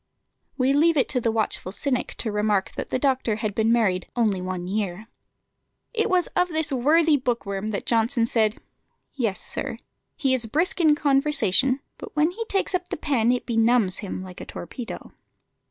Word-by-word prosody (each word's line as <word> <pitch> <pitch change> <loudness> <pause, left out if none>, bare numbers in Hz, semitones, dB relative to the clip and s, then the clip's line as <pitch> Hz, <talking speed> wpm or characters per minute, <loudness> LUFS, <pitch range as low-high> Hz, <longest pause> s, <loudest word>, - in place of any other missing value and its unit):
We 265 +1 +2
leave 320 +3 +4
it 270 - +3
to 250 - +1
the 230 - +1
watchful 220 -4 -1
cynic 255 +5 -2
to 225 - -1
remark 210 -2 0
that - - -5
the - - 0
doctor 255 -4 +1
had 215 -1 -3
been 220 +2 +2
married 205 -6 +1
only 215 -6 +1
one 185 -1 -4
year. 200 +1 -3 0.9
It 450 -1 0
was 365 -1 +3
of 360 0 +3
this 315 -3 0
worthy 300 +4 +4
book 245 -4 -2
worm 200 +1 -3
that 215 -2 -3
Johnson 230 +1 +2
said 220 -2 +1 0.5
"Yes, 225 -8 -1
sir, - - -4 0.4
he 270 -4 +1
is 240 -3 +2
brisk 330 +9 0
in 310 -3 +5
conversation, 275 -3 +2 0.2
but - - -10
when 305 +3 +3
he 450 +5 -4
takes 390 -2 0
up 365 -1 -1
the - - -3
pen 245 -7 +1
it 250 - -1
benumbs 225 -4 +2
him 190 -2 -5
like 185 -1 -10
a - - -7
torpedo." 230 +7 -8
240 Hz, 185 wpm, -24 LUFS, 210-290 Hz, 0.9 s, in